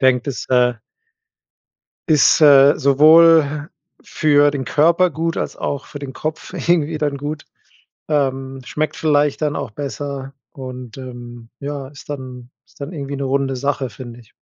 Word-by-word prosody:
Denke, 130 -2 +3
das, 130 - -6
äh 125 -1 +3 1.3
ist, 155 -1 +4
äh, 145 -1 +7
sowohl 155 +1 +5 0.3
für 145 -2 +2
den 140 -2 -4
Körper 170 +6 +3
gut 165 +2 -3
als - - -4
auch 145 -1 -4
für 145 - -9
den 140 -2 -7
Kopf 155 +4 -6
irgendwie 160 -2 0
dann 145 -2 -1
gut 150 +2 -5 0.6
ähm, 135 -3 -1
schmeckt 150 +3 -3
vielleicht 150 -1 +1
dann 150 -1 0
auch 115 - -5
besser 140 +1 -6 0.2
und, 130 -2 -9
ähm, 120 -2 -10
ja, 140 -1 -5
ist 145 +1 -15
dann 125 -3 -8 0.2
ist - - -26
dann 145 +5 -6
irgendwie 140 -3 -6
'ne 140 - -5
runde 135 0 -1
Sache, 140 0 -2
finde 120 +2 -10
ich. 115 -2 -21
140 Hz, 155 wpm, -19 LUFS, 130-150 Hz, 1.3 s, äh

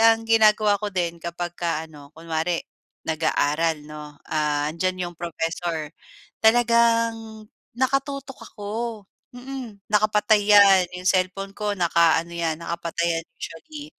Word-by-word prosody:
ang 225 0 +5
ginagawa 215 -2 +5
ko 210 -1 -3
din 170 -2 -1
kapagka 170 -1 -3
ano 145 -1 -15
kunwari 165 +1 -2 0.5
nag-aaral, 160 0 +1
'no, 150 -1 -10
ah, 150 -1 0
'andiyan 185 +1 -2
yung 175 - -18
professor, 165 -1 -3 0.6
talagang 230 -1 +2 0.3
nakatutok 275 +1 -1 0.2
ako, 205 -1 -7 0.6
mm. 245 -5 -8
Nakapatay 210 0 +3
'yan, 195 -2 +7
'yong 180 0 -8
cellphone 190 +1 0
ko 210 -1 -1
na 175 -2 +1
ano 170 0 +3
'yan, 165 -2 -1
nakapatay 170 0 -2
'yan - - -15
usually. 295 - -8
180 Hz, 120 wpm, -24 LUFS, 165-220 Hz, 0.6 s, yan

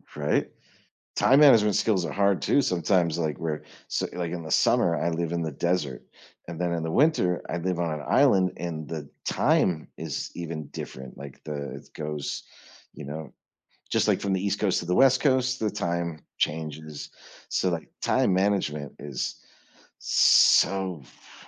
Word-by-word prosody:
Right. 75 0 0 0.7
Time 135 +3 +5
management 110 -8 +6
skills 95 -6 +1
are 75 - -5
hard 100 -1 +2
too 140 - +3
sometimes, 85 -3 +1
like, 80 -3 -1
we're 80 -3 -3 0.3
so, - - -1
like 85 -2 -3
in 85 -2 -4
the 80 - -8
summer, 85 -1 +3
I 85 - 0
live 85 0 -2
in 85 -1 -1
the 80 - -2
desert 75 -4 -1 0.5
and 85 -1 -6
then 85 -1 0
in 85 -1 -2
the 80 - -3
winter 120 - +2
I 85 - -2
live 90 0 -2
on 85 -2 -1
an - - -9
island 95 -2 +4
and 80 -3 -5
the 80 -2 -6 0.2
time 80 -4 +1
is - - -4
even 80 -3 -5
different, 65 0 -8
like, 70 -1 -10
the 70 -2 -5
it - - -12
goes, 75 -1 -4 0.5
you - - -9
know, 75 0 -7 0.6
just - - +1
like - - +2
from 100 -1 0
the 95 +1 -1
East 100 +1 0
coast 100 -4 +1
to 85 - -6
the 90 +1 0
West 130 -1 +5
coast, 130 -2 +1
the 110 -1 0
time 85 -2 -2 0.2
changes. 75 -1 -3 0.4
So, 95 - +1
like, 85 -2 -4
time 95 - +2
management 90 -7 0
is 70 -3 -5 0.6
so 95 -5 +4
f - - -19
85 Hz, 175 wpm, -26 LUFS, 75-95 Hz, 0.7 s, management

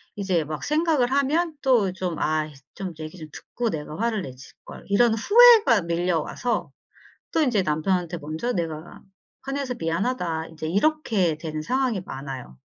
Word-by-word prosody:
이제 190 -5 0
막 150 0 -6
생각을 300 -5 +1
하면 305 +4 +1
또 240 -8 +3
좀 180 -3 -3
'아이 155 -1 0 0.2
좀 190 -3 -5
얘기 155 +3 -7
좀 155 - -9
듣고 240 -1 -4
내가 150 0 -5
화를 225 -2 0
냈을걸.' 130 -4 -11
이런 225 +3 +4
후회가 420 - +7
밀려와서 170 +7 -1 0.6
또 320 - +2
이제 240 -8 +2
남편한테 175 +3 0
먼저 160 +11 -3
내가 165 -4 -5 0.4
"화내서 275 -2 -3
미안하다." 165 -1 -1
인제 160 -1 -6
이렇게 205 - +1
되는 155 -1 -5
상황이 250 +3 0
많아요. 135 - -7
185 Hz, 305 characters per minute, -24 LUFS, 160-250 Hz, 0.6 s, 후회가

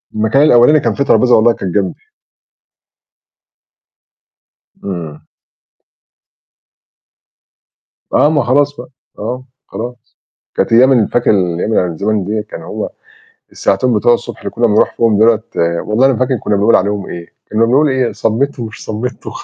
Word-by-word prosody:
المكان 110 +6 +2
الأولاني 150 +1 +5
كان 115 -5 -1
فيه 140 - -1
ترابيزة 125 -3 +3
والله 115 +2 +4
كان 95 -5 -5
جانبي. 100 0 -2 2.8
إمم. 85 -6 -6 2.9
آه، 150 - +4
ما 150 -3 +1
خلاص 145 +4 +1
بقى. - - -10 0.3
آه، 125 +4 -4 0.2
خلاص. 120 +2 -8 0.4
كانت - - 0
أيام 130 +4 +6
ال 120 -5 +3
فاكر 120 - +1
الأيام 90 0 0
اللي - - +2
هي 90 - -2
من 80 - -7
زَمَن 105 +1 -1
ديّة 105 +2 -2
كان - - -10
هو - - -5 0.6
الساعتين 120 +6 0
بتوع 115 +3 +3
الصبح 120 -1 -5
اللي - - -5
كُنّا 120 +1 +1
بنروح 105 -1 +2
فيهم 115 -3 +2
دُولة 110 0 +4 0.4
والله 115 +5 +2
ما 130 -3 0
فاكر 130 0 0
كُنّا 105 - -1
بنقول 105 +3 +3
عليهم 100 +1 0
إيه. 85 -1 -9 0.2
كُنّا 110 +2 +2
بنقول 140 +6 +3
إيه؟ 130 -3 0
صَمِّت 130 +6 -1
ومش 110 -2 -7
صَمِّت 115 +4 -5
وخ - - -7
115 Hz, 150 wpm, -14 LUFS, 105-125 Hz, 2.9 s, أيام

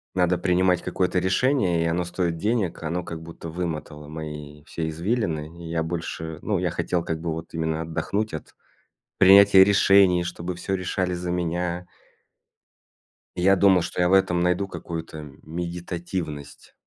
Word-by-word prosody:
надо 90 -1 +2
принимать 90 -1 +2
какое-то 90 0 0
решение, 95 -2 +2
и - - -1
оно 85 +2 0
стоит 90 -1 -2
денег, 105 0 -1
оно 85 +3 -2
как 80 -2 -7
будто 85 0 -9
вымотало 80 -3 -5
мои 75 -1 -8
все 80 0 -4
извилины 85 -3 -2
и 80 - -7
я 80 0 -1
больше 80 -1 -5
Ну - - 0
я - - -1
хотел 90 -2 -1
как 80 -1 -3
бы 85 -1 -2
вот 80 +1 -6
именно 80 -1 -1
отдохнуть 100 +6 -2
от 80 - -8 0.6
принятия 100 0 +8
решений, 95 -2 +5
чтобы 85 +1 -5
всё 95 +2 -4
решали 90 -1 -1
за 90 0 -4
меня. 90 0 -2 1.5
Я 95 +2 +4
думал, 95 -1 +5
что 90 - -3
я 90 - +3
в - - +3
этом 95 -2 +3
найду 90 +2 +1
какую-то 80 -4 -7 0.2
медитативность. 85 -3 -5
85 Hz, 155 wpm, -24 LUFS, 80-90 Hz, 1.5 s, принятия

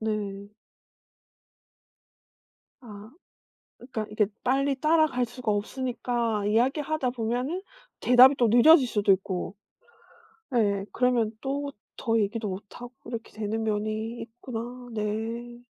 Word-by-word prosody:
네. 205 -2 -4 2.3
아. 215 -3 -11 0.7
그니까 240 -4 -5
이게 210 -1 +2 0.2
빨리 270 +1 +1
따라갈 305 -5 +3
수가 240 -2 -3
없으니까 235 0 -2
이야기하다 265 +5 +1
보면은 250 +9 -2 0.4
대답이 250 +3 +7
또 240 -3 +3
늦어질 260 +5 +7
수도 205 -2 +1
있고 190 +1 -2 1.0
예예 200 -4 +1
그러면 240 -3 +2
또 280 +1 -3 0.3
더 230 0 +1
얘기도 215 +2 -1
못하고 205 +6 -8
이렇게 230 -1 -6
되는 220 +1 -3
면이 215 +2 -2
있구나. 240 +1 -7
네. 225 +3 -3
230 Hz, 235 characters per minute, -27 LUFS, 215-250 Hz, 2.3 s, 대답이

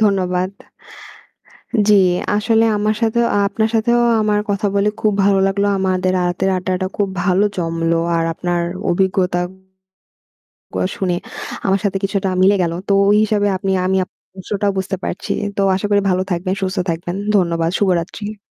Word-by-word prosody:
ধন্যবাদ। 185 -2 +1 1.4
জি, 210 - +6 0.4
আসলে 225 +1 +2
আমার 210 +1 0
সাথেও 230 +1 +2 0.2
আপনার 220 +2 0
সাথেও 235 +2 +2 0.2
আমার 210 -1 +1
কথা 205 +1 0
বলে 200 +1 +3
খুব 215 -1 +2
ভালো 195 -1 +3
লাগলো। 200 +1 0
আমাদের 185 -1 0
আ - - +1
রাতের 190 +2 -1
আড্ডাটা 185 0 -2
খুব 200 -2 0
ভালো 185 +2 +2
জমলো। 165 -1 0 0.2
আর 165 - +1
আপনার 175 +1 -1 0.3
অভিজ্ঞতাগুলা 190 +1 -1 1.1
শুনে 185 -2 0 0.5
আমার 195 0 +2
সাথে 200 -2 0
কিছুটা 195 -1 0
মিলে 195 +2 +5
গেল। 165 -1 -1
তো - - 0 0.2
ওই 205 - +5
হিসাবে 210 -1 +1
আপনি 190 +1 -2
আমি 190 +1 +1
আপনার - - -43 0.2
বিষয় 200 +3 -4
টা 205 - +3
বুঝতে 190 0 -2
পারছি। - - -4 0.2
তো 200 - 0
আশা 190 - -2
করি 205 0 +4
ভালো 185 0 +1
থাকবেন, 180 +2 -1
সুস্থ 185 0 -2
থাকবেন। 175 +2 -3 0.2
ধন্যবাদ। 170 -3 +1
শুভরাত্রি। 200 +3 -1
190 Hz, 155 wpm, -18 LUFS, 180-205 Hz, 1.4 s, জি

